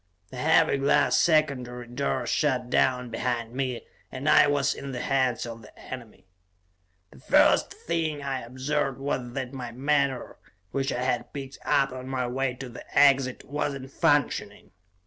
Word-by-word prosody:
The 130 - -8
heavy 160 +2 +3
glass 140 +1 +3
secondary 135 -7 +1
door 125 +1 -2
shot 130 -2 0
down 125 -2 +2
behind 115 0 -2
me, 130 -2 -3 0.3
and 130 +4 -5
I 150 - +7
was 140 -1 +2
in 140 -1 -7
the 125 - -4
hands 130 -3 +1
of 115 -1 -8
the 105 - -16
enemy. 120 -7 -10 0.9
The 70 - -16
first - - +4
thing 160 -3 -3
I 135 -2 -2
observed 135 +3 -2
was 130 -3 -3
that 130 -1 -4
my 125 -3 -6
menore, 140 +1 0 0.3
which 135 0 -1
I 125 - -2
had 125 -1 -1
picked 135 -1 -7
up 135 -1 +2
on 130 0 -7
my 130 -1 -1
way 125 +1 -1
to 130 +1 -7
the 120 - -9
exit, 135 -2 +4
was 145 0 -2
not 135 +1 -11
functioning. 145 -4 0
130 Hz, 165 wpm, -26 LUFS, 125-140 Hz, 0.9 s, I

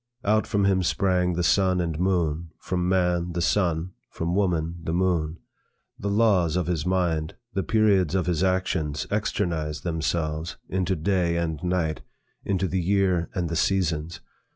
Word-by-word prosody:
Out 110 +2 +2
from 100 -3 +1
him 95 -1 +3
sprang 90 0 +1
the 90 +1 -1
sun 95 0 +3
and 85 -3 -2
moon; 85 -3 0
from 90 -1 -2
man, 90 -2 +1
the 85 - -2
sun; 85 -1 +1 0.2
from 85 +1 -3
woman, 85 -4 0
the 80 0 -3
moon. 85 -3 0 0.6
The 100 - -2
laws 100 -6 +3
of 90 -2 +1
his 85 -2 -1
mind, 85 -4 0 0.2
the 95 - 0
periods 95 -3 +2
of 95 - +1
his 90 -1 0
actions 90 -5 0
externized 85 -7 -1
themselves 80 -1 -2
into 95 0 0
day 85 0 +1
and 80 -2 -2
night, 90 -4 0 0.4
into 95 -1 0
the 90 +1 -1
year 90 -2 +1
and 90 -3 0
the 85 - -3
seasons. 85 -2 0
90 Hz, 155 wpm, -25 LUFS, 80-95 Hz, 0.6 s, him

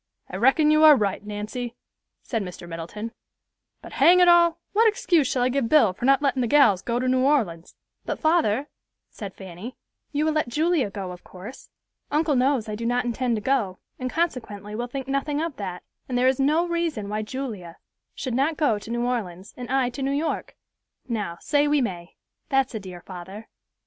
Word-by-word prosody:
"I 185 - -4
reckon 270 +7 +4
you 305 0 +4
are 305 -1 +10
right, 205 -5 -1
Nancy," 210 +4 -5 0.5
said 225 -3 -2
Mr. 180 -2 -8
Middleton; 170 +7 -6 0.7
"but - - -10
hang 360 +1 +5
it 360 - +6
all, 340 -1 +5 0.2
what 450 +2 +5
excuse 370 - +2
shall 250 -1 0
I 250 - +2
give 255 -3 0
Bill 255 -11 +5
for 235 - -5
not 275 +2 +4
lettin' 270 -2 +1
the 240 - +1
gals 220 -9 +5
go 235 0 -1
to 255 +1 -1
New 255 0 +3
Orleans?" 215 - 0 0.3
"But, - - -3
father," 300 -6 +2 0.4
said 200 -3 -8
Fanny, 190 +6 -9 0.4
"you 300 0 0
will 315 - +2
let 305 -3 0
Julia 310 - +1
go, 195 -2 -6
of 180 0 -11
course. 195 +8 -11 0.4
Uncle 300 0 +1
knows 255 -2 +2
I 215 - -4
do 220 +2 -5
not 245 +1 0
intend 240 0 0
to 210 - -4
go, 220 -9 0 0.2
and 255 0 -2
consequently 230 - -3
will 240 +3 -3
think 265 +1 -6
nothing 275 +2 -1
of 325 -3 -3
that; 185 -3 -5 0.3
and 250 - -1
there 250 +1 +3
is 260 0 +2
no 310 +6 +2
reason 335 -11 -2
why 210 +1 -2
Julia 215 -8 -6 0.4
should 255 - -4
not 285 +5 +1
go 260 -10 +2
to 205 - -11
New 240 +1 -1
Orleans, 200 -6 -4
and 250 -1 -8
I 260 -1 +1
to 245 - -7
New 270 - 0
York. 300 +3 -2 0.5
Now, 210 -8 -3
say 290 0 +2
we 295 0 +3
may; 180 -8 -4 0.3
that's 270 -3 +1
a 220 - -3
dear 185 -3 -9
father." 190 +5 -10
250 Hz, 200 wpm, -24 LUFS, 210-290 Hz, 0.7 s, are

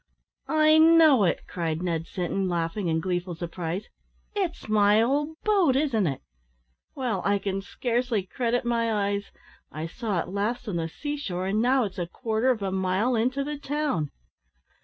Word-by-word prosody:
"I 310 0 +5
know 315 -8 +6
it!" 170 - +1
cried 165 -1 -3
Ned 165 -2 -2
Sinton, 185 +1 -2
laughing 170 +3 -1
in 160 0 +1
gleeful 180 0 -2
surprise; 175 +3 -4 0.5
"it's 375 - -3
my 210 0 +4
old 290 +7 +1
boat, 390 -11 +3
isn't 260 - +2
it? 135 -3 -3 0.7
Well, 240 -8 -1
I 200 0 +2
can 195 0 -3
scarcely 240 0 -1
credit 240 +5 -1
my 230 -1 +1
eyes! 200 -1 0 0.5
I 155 +1 -5
saw 205 +3 -3
it 170 - -4
last 210 +6 -2
on 190 -5 -2
the 165 -1 -2
sea 295 - -4
shore, 185 -10 -3
and 205 +3 +1
now 255 +2 +3
it's 195 -3 -5
a 175 - -2
quarter 225 +5 -1
of 230 -5 +1
a 190 - -1
mile 190 +6 +1
into 255 +5 +1
the 295 0 -5
town!" 285 - -1
210 Hz, 170 wpm, -26 LUFS, 180-260 Hz, 0.7 s, know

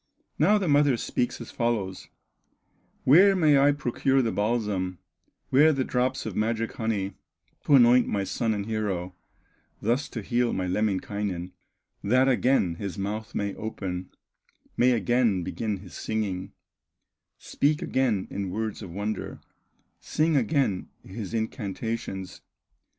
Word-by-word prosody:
Now 195 +8 +5
the 195 -3 -1
mother 145 -3 +4
speaks 120 +2 -2
as - - -8
follows: 110 -6 -2 1.0
"Where 190 +8 +7
may 155 -6 +4
I 140 +1 +5
procure 135 -1 +1
the 115 - 0
balsam, 105 -4 -1 0.5
Where 150 +4 +6
the 135 -3 0
drops 130 +1 -1
of 110 -4 -5
magic 115 +1 0
honey, 105 -4 -2 0.5
To 145 - +6
anoint 125 -1 +6
my 100 -1 -1
son 110 +3 -1
and 100 -1 -3
hero, 100 -5 -2 0.7
Thus 120 +8 0
to 115 - -6
heal 120 +3 +1
my 95 - -1
Lemminkainen, 95 -2 -2 0.5
That 130 +6 +3
again 125 -9 +2
his 100 +1 -5
month 110 +3 -4
may 100 -1 -1
open, 95 -4 -5 0.7
May 125 +1 +4
again 115 -5 +2
begin 105 +3 -3
his 95 -2 -13
singing, 100 -3 -3 0.8
Speak 150 +2 0
again 125 -7 0
in 100 -1 -3
words 110 +3 -3
of 95 - -7
wonder, 105 +5 -4 0.6
Sing 160 0 0
again 135 - +1
his 95 0 -7
incantations? 110 -3 -4
110 Hz, 130 wpm, -26 LUFS, 100-130 Hz, 1.0 s, Where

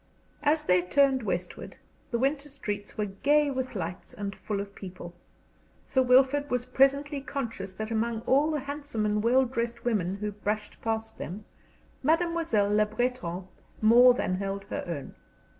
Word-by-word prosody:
As 300 +1 +2
they 180 0 +4
turned 265 +8 +3
westward, 180 -4 -4 0.3
the 235 - 0
winter 275 +3 0
streets 210 -7 -5
were 210 - 0
gay 285 +9 +2
with 260 -2 -3
lights 180 -1 -5
and 200 -1 -4
full 205 -2 -3
of 200 0 -6
people. 180 -3 -9 0.7
Sir 260 - +2
Wilfrid 265 +3 +4
was 250 -1 0
presently 275 +2 +2
conscious 230 -9 -4
that 215 +3 -5
among 225 0 0
all 280 +6 +3
the 305 -3 -1
handsome 285 -5 -3
and 210 0 +1
well 255 +4 +4
dressed 235 -1 -3
women 195 -6 0
who 210 +1 -3
brushed 210 +1 -4
past 225 0 -3
them, 195 +6 -6 0.6
Mademoiselle 320 -9 +2
Le 210 0 +4
Breton 210 -6 -2 0.3
more 245 +3 +7
than 185 - -1
held 195 0 -3
her - - -2
own. 160 -5 -5
230 Hz, 160 wpm, -28 LUFS, 205-270 Hz, 0.7 s, more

